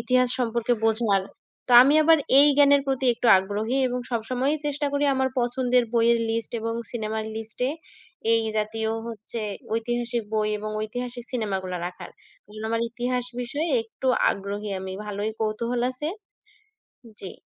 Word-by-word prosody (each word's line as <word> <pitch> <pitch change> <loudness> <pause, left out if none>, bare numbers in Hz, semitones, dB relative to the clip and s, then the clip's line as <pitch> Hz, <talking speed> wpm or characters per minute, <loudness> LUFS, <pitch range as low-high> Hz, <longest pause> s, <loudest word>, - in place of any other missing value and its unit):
ইতিহাস 255 0 +2
সম্পর্কে 235 0 0
বোঝার। 220 -3 +2 0.5
তো - - +1
আমি 280 +3 +4
আবার 325 +1 +6 0.2
এই 290 - +7
জ্ঞানের 285 -1 +6
প্রতি 265 -1 0
একটু 240 - -2
আগ্রহী 210 +6 -2
এবং 250 0 -3
সব 235 - 0
সময়ই 265 +5 0
চেষ্টা 290 0 -1
করি 285 0 +1
আমার 265 0 +1
পছন্দের 250 0 +1
বইয়ের 235 0 +4
লিস্ট 225 -1 -2
এবং 230 0 -3 0.2
সিনেমার 220 -2 -3
লিস্টে 225 +3 -2 0.6
এই 225 0 +4
জাতীয় 220 +1 -1 0.2
হচ্ছে 225 0 -6 0.3
ঐতিহাসিক 240 +1 -1
বই 215 -1 +1
এবং 215 +1 -5
ঐতিহাসিক 245 +2 -5
সিনেমাগুলো 190 -6 -2
রাখার। 180 0 -9 0.4
এবং 215 +1 -10
আমার 230 0 0
ইতিহাস 245 +1 -2 0.2
বিষয়ে 285 +7 -2
একটু 225 +3 -8 0.2
আগ্রহী 200 +1 -5
আমি, 190 0 -6
ভালোই 210 +1 -3
কৌতূহল 230 +3 -1
আছে। 275 +4 -4 1.1
জি। 190 - -7
235 Hz, 150 wpm, -25 LUFS, 215-250 Hz, 1.1 s, এই